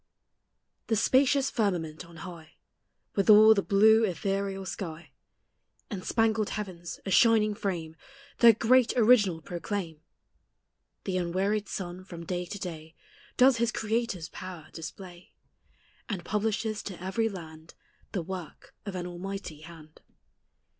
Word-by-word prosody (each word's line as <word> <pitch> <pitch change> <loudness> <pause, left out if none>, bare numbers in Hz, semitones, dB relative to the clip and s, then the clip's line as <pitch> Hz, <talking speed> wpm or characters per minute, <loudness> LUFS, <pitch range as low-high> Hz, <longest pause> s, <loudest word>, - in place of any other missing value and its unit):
The 225 - +1
spacious 265 +4 +3
firmament 180 - -1
on 170 - -15
high, 170 -3 -10 0.6
With 200 +1 0
all 215 +1 +9
the 200 - +1
blue 220 +3 +5
ethereal 195 0 -2
sky, 165 -6 -6 0.8
And 190 -3 -5
spangled 220 -2 +1
heavens, 180 -5 -6
a 195 - -3
shining 215 +1 +5
frame, 175 -7 -4 0.4
Their 235 -1 +8
great 245 +3 +3
Original 210 -8 +4
proclaim; 175 -3 -5 1.0
The 185 -2 -2
unwearied 195 +4 -1
sun, 180 -1 -5
from 170 -3 -9
day 180 +1 -3
to 205 - -6
day, 165 -4 -7 0.4
Does 255 -1 +6
his 235 0 +1
Creator's 220 -7 -2
power 180 -4 -9
display, 175 +2 -10 0.7
And 185 -6 -4
publishes 215 +1 -1
to 190 -4 -8
every 195 +5 -1
land 160 -4 -10 0.4
The 185 - -2
work 180 -2 -8
of 195 - -4
an 180 -1 -4
Almighty 180 -2 -6
hand. 155 -1 -14
195 Hz, 125 wpm, -28 LUFS, 170-215 Hz, 1.0 s, all